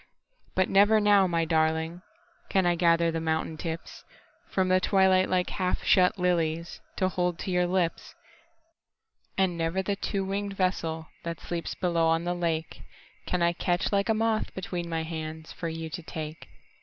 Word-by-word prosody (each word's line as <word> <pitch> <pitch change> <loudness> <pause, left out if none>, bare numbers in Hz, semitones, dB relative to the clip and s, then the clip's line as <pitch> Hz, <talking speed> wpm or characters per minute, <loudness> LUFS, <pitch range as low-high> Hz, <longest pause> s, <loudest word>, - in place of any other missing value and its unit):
But 185 0 +3
never 205 +3 +5
now, 205 -2 +5
my 165 -2 +1
darlingCan 170 - -1
I 175 - +4
gather 170 -1 +3
the 165 0 -2
mountain 160 0 -1
tipsFrom 165 +3 -5
the 185 0 +4
twilight 190 0 +3
like 180 -1 +1
half 185 -1 -1
shut 180 -1 +4
liliesTo 170 +1 -1
hold 180 -2 0
to 190 - -4
your 180 0 +2
lips. 175 -2 -1 1.2
And 190 -2 +2
never 170 +3 -1
the 200 +1 -1
two 195 -1 -2
winged 200 0 -3
vesselThat 165 -3 -2
sleeps 170 -1 -4
below 170 -2 +1
on 165 +1 +2
the 175 0 -1
lakeCan 170 +1 -4
I 170 0 +3
catch 175 +2 0
like 200 +1 +1
a 220 - +3
moth 225 0 0
between 175 -2 -4
my 165 -1 -1
handsFor 160 +1 -5
you 165 0 -5
to 175 - -5
take. 155 -1 -7
175 Hz, 150 wpm, -28 LUFS, 165-190 Hz, 1.2 s, never